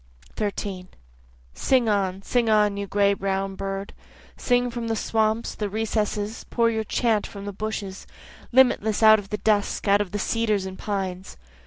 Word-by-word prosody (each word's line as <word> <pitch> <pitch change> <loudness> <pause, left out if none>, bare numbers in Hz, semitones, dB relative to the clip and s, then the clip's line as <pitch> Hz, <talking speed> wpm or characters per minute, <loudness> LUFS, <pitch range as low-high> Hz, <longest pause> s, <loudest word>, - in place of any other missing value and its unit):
13 200 -3 -3 0.7
Sing 255 -3 +2
on, 195 -2 0
sing 240 0 +1
on 210 -1 +3
you 200 0 -4
gray 200 0 +3
brown 195 0 -2
bird, 195 0 -5 0.4
Sing 245 0 +1
from 235 -1 -4
the 225 - 0
swamps, 220 +1 0
the 210 -1 -3
recesses, 215 0 -2
pour 230 -1 +1
your 220 -1 -1
chant 220 -1 0
from 200 -1 -9
the 205 - -5
bushes, 200 -2 -5 0.4
Limitless 235 -4 +3
out 220 0 +8
of 195 -1 -10
the 210 - -2
dusk, 210 -1 0
out 200 +1 +5
of 205 - -4
the 205 - -2
cedars 215 -1 0
and 190 0 -7
pines. 190 -2 -4
210 Hz, 165 wpm, -24 LUFS, 195-220 Hz, 0.7 s, out